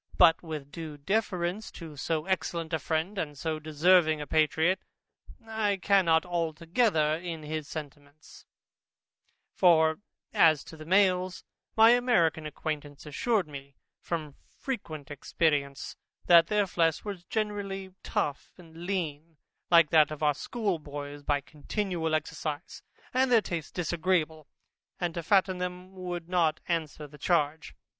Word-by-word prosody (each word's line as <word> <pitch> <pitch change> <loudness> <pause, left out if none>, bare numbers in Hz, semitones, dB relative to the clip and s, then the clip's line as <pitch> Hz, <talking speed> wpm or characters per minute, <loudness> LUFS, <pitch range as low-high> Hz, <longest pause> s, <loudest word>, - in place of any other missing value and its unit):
But 170 -3 +6
with 155 -4 -7
due 160 -3 -7
deference 190 +3 -1
to 160 -3 -9
so 155 +3 -2
excellent 170 -3 -2
a 160 - +1
friend, 165 +7 -2
and 150 -4 -4
so 160 +1 -2
deserving 155 +1 +3
a 150 - -4
patriot, 160 +4 +2 0.7
I 220 -3 0
cannot 185 -4 +3
be - - -14
altogether 165 0 +1
in 165 -2 -6
his 155 -1 -4
sentiments; 145 0 -10 1.1
for 160 -3 +4 0.3
as 160 -8 +5
to - - -11
the 155 0 -11
males, 185 -1 +2 0.3
my 225 +1 +8
American 175 -11 +2
acquaintance 150 -1 -5
assured 195 - 0
me 140 -2 -10 0.2
from 155 -4 -4
frequent 155 - -6
experience, 145 -1 -1 0.3
that 170 -1 +7
their 210 +1 +2
flesh 165 -2 0
was 200 -4 -5
generally 200 -3 -3
tough 145 -1 -2
and 170 -1 -11
lean, 165 -4 -3 0.3
like 170 -4 +6
that 155 -2 +6
of 155 0 -6
our 150 -1 +4
schoolboys, 145 - -4
by 145 0 0
continual 160 +2 -2
exercise, 155 -1 -4 0.3
and 260 0 +2
their 235 - +7
taste 165 -4 -5
disagreeable, 165 -3 0 0.5
and 175 -2 -1
to 170 - -3
fatten 185 +1 +2
them 180 +1 -5
would 180 -2 -5
not 170 -3 +1
answer 160 -3 -2
the 150 0 -14
charge. 155 -2 0
165 Hz, 135 wpm, -29 LUFS, 155-185 Hz, 1.1 s, my